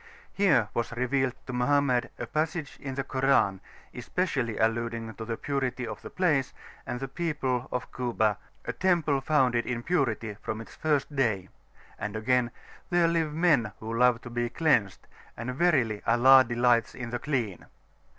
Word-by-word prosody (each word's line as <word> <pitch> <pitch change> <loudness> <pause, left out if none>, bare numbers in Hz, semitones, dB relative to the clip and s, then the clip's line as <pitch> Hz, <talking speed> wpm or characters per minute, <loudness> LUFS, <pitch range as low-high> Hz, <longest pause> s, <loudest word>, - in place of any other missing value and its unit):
Here 150 - +3
was 120 - -2
revealed 125 +1 0
to 130 - -6
Mohammed 125 0 +2
a 120 - -4
passage 155 +1 -3
in 135 -2 -5
the 135 - -1
Koran 130 -8 +2 0.3
especially 125 - -2
alluding 115 0 -1
to 110 - -7
the 115 0 -3
purity 135 -3 -2
of 115 - -7
the - - -8
place 155 -8 +1 0.3
and 120 - -2
of 125 - -7
the 135 - -3
people 135 -5 -2
of 125 0 -4
Kuba, 115 -4 0 0.3
"a - - -3
Temple 165 -7 +1
founded 130 -5 +2
in 120 -1 -3
Purity 120 -10 0
from 110 - -4
its 115 - -10
first 150 -2 -1
Day;" 105 -9 0 0.5
and 105 0 -4
again: 120 +2 +1 0.4
"there 175 -1 +3
live 165 -2 0
Men 150 - +3
who 110 +1 -5
love 125 0 +4
to 120 - -9
be 120 0 -1
[p.411]cleansed, 120 - +1 0.4
and 120 +2 -4
verily 125 -9 +2
Allah 130 +3 +7
delights 120 -1 +2
in 120 -2 -6
the 120 - -2
Clean." 120 - -3
125 Hz, 165 wpm, -28 LUFS, 115-145 Hz, 0.5 s, Allah